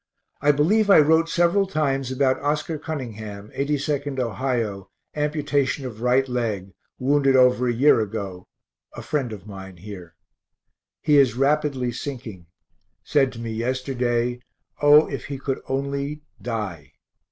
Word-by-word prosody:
I 145 +1 +5
believe 200 +9 +2
I 195 - +8
wrote 160 +2 +4
several 175 +4 +2
times 135 -6 -1
about 130 0 +1
Oscar 150 +2 -1
Cunningham, 110 -9 -6
82nd 145 0 -1
Ohio, 115 -4 -2 0.3
amputation 145 -2 0
of 115 -3 -7
right 125 +2 +3
leg, 110 -6 -2 0.3
wounded 135 0 +3
over 125 -1 +4
a - - +2
year 125 +2 +4
ago, 100 -4 -4 0.5
a - - -7
friend 135 -6 -2
of 105 -2 -9
mine 95 -3 -10
here. 90 -3 -10 0.9
He 150 -2 +4
is 130 -5 +4
rapidly 135 -2 +1
sinking; 120 -9 -7 0.6
said 135 -3 +2
to 115 - -9
me 115 -1 -4
yesterday, 125 0 -1 0.4
O, 150 +1 +7
if 135 -4 -5
he 140 0 -5
could 135 0 -3
only 140 +2 -3 0.2
die. 100 - -5
130 Hz, 135 wpm, -23 LUFS, 115-145 Hz, 0.9 s, I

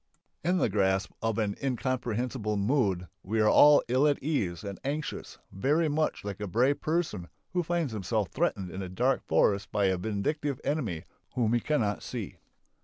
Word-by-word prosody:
In 180 +2 +2
the - - +2
grasp 95 -2 +1
of 115 -2 0
an 105 -3 0
incomprehensible 125 -4 -1
mood 100 -5 +1
we 110 +4 -2
are 145 +7 +7
ill 130 +5 +3
at 145 - +2
ease 105 - -1
and 100 -2 -6
anxious, 145 +2 -4
very 150 - +1
much 155 +1 0
like 100 -1 -5
a 105 - -3
brave 125 +9 +2
person 155 - -1 0.3
who 180 - +2
finds 170 -6 -1
himself 105 0 -1
threatened 105 - -1
in 95 - -5
a 95 - -5
dark 125 +8 +1
forest 100 -1 +2
by 105 -1 +1
a 95 -1 +1
vindictive 125 - -2
enemy 115 - -2 0.3
whom 115 -2 +1
he 120 - +3
cannot 110 -6 0
see. - - -6
115 Hz, 170 wpm, -29 LUFS, 100-145 Hz, 0.3 s, are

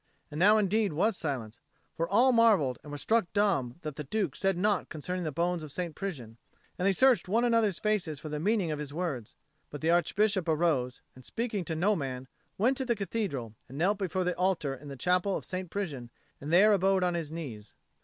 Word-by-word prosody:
And 150 - -5
now 210 +4 +6
indeed 210 -2 +1
was 210 +8 +2
silence; 125 -9 -4 0.3
for 165 +1 -2
all 240 +7 +5
marvelled 210 - +4
and 150 - -11
were 145 - -5
struck 220 +4 +1
dumb 175 - +1
that 150 -3 -5
the 150 - -4
Duke 175 -1 -2
said 195 -2 0
naught 205 0 +1
concerning 180 +3 -4
the 155 - -2
bones 175 +2 -1
of 155 -2 -8
St. 175 +1 -3
Prisian, 125 - -6 0.4
and 185 - +2
they - - +5
searched 250 -1 +3
one 230 +5 +2
another's 225 -6 +2
faces 190 -9 -1
for 155 - -8
the 150 0 -3
meaning 195 -1 +1
of 150 - -3
his 145 -1 -5
words. 145 -9 -4 0.3
But 145 - -8
the 160 +1 +2
Archbishop 185 +1 +2
arose, 150 -6 +1
and, 130 - -15
speaking 220 - -3
to 160 - -3
no 195 +6 +2
man, 130 -5 -4 0.3
went 250 +6 +2
to 265 - -2
the 240 -2 +1
Cathedral, 190 - -3 0.2
and 135 - -9
knelt 195 +6 +1
before 185 -1 -1
the 180 0 0
altar 180 -6 0
in 135 +2 -10
the 140 -1 -7
chapel 180 +7 +1
of - - -8
St. 185 -1 -5
Prisian, 150 -12 -4 0.3
and 145 +3 -6
there 205 +5 +6
abode 190 -1 +2
on 180 -1 +1
his 165 -3 -3
knees. 125 -11 -7
175 Hz, 215 wpm, -29 LUFS, 145-205 Hz, 0.4 s, now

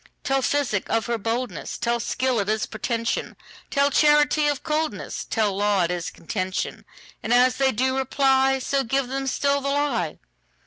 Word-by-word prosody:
Tell 270 0 +1
physic 265 -7 0
of 225 - +1
her 235 -1 -2
boldness; 225 -4 -3
Tell 235 0 0
skill 255 +1 0
it 200 0 -1
is 215 0 0
pretension; 230 +1 -3 0.3
Tell 280 0 +2
charity 295 +1 +4
of 290 -1 -1
coldness; 310 0 -2
Tell 210 -4 0
law 205 -2 +2
it 170 - 0
is 175 -1 -3
contention:And 185 +4 -5
as 250 +1 +4
they 270 -1 +3
do 260 +3 0
reply, 270 0 +2
So 270 +1 0
give 265 +1 -1
them 270 +1 -3
still 280 +2 +1
the 275 - -2
lie. 275 - 0
255 Hz, 165 wpm, -24 LUFS, 220-275 Hz, 0.3 s, charity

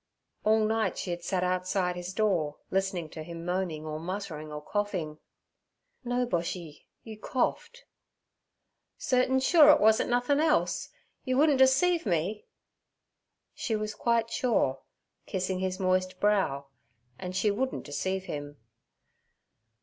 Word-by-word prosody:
All 215 0 +3
night 220 -2 0
she 180 - -3
had 175 0 -4
sat 185 -1 -1
outside 180 0 0
his 175 +1 -5
door 185 -8 0
listening 190 -3 -1
to 160 - -8
him 170 +1 -8
moaning 175 -4 -2
or 155 0 -4
muttering 165 -4 -5
or 150 - -5
coughing. 170 -3 -3 0.8
'No, 245 0 0
Boshy. 170 -6 -4 0.2
You 220 -2 -10
coughed.' 475 - -2 1.1
'Certain 255 +1 +2
sure 300 +3 +6
it 300 - +7
wuzn't 220 +1 +4
nothin' 245 +4 +2
else? 310 0 +1 0.3
Yer 255 0 0
wouldn't 290 -2 +4
deceive 275 +4 +4
me?' 185 +4 -1 1.1
She 225 - -2
was 215 0 -3
quite 230 +1 0
sure, 205 - +1 0.5
kissing 185 0 -2
his 185 0 -2
moist 185 0 0
brow, 195 -10 +1 0.5
and 185 0 -6
she 205 +3 +2
wouldn't 260 +6 -2
deceive 190 +6 -2
him. 145 -4 -6
190 Hz, 130 wpm, -29 LUFS, 175-235 Hz, 1.1 s, it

